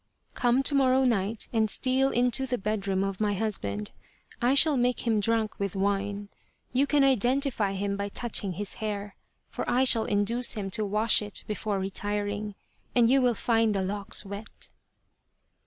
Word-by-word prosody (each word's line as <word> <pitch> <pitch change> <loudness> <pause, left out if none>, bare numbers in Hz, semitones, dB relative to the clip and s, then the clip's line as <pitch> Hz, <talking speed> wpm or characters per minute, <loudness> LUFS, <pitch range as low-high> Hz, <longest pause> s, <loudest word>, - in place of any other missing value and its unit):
" - - -46
Come 245 +2 +2
to 285 - +1
morrow 265 -1 +3
night 220 -3 0
and 220 -1 +2
steal 260 +4 +1
into 250 +1 +1
the 250 0 -1
bedroom 200 -2 -1
of 195 0 -4
my 205 -1 +1
husband. 105 - -3 0.5
I 250 +3 +3
shall 300 +1 +5
make 250 -1 0
him 225 -2 +2
drunk 220 +1 -1
with 200 -1 -3
wine. 200 +1 -2 0.4
You 270 +3 +2
can 290 -1 +3
identify 255 -4 +1
him 200 +1 -2
by 200 0 -3
touching 205 -3 -1
his 200 +2 -3
hair, 205 -1 -4 0.3
for - - -5
I 255 +2 +3
shall 230 -4 +4
induce 220 +4 +1
him 200 -4 -4
to 215 +1 0
wash 215 +3 +3
it 205 -1 -4
before 210 -1 -3
retiring, 205 +1 -2 0.4
and 240 -1 +4
you 270 0 +4
will 245 -2 +2
find 225 -1 +1
the 195 - 0
locks 200 +2 -3
wet." 200 +2 -9
215 Hz, 170 wpm, -27 LUFS, 200-245 Hz, 0.5 s, shall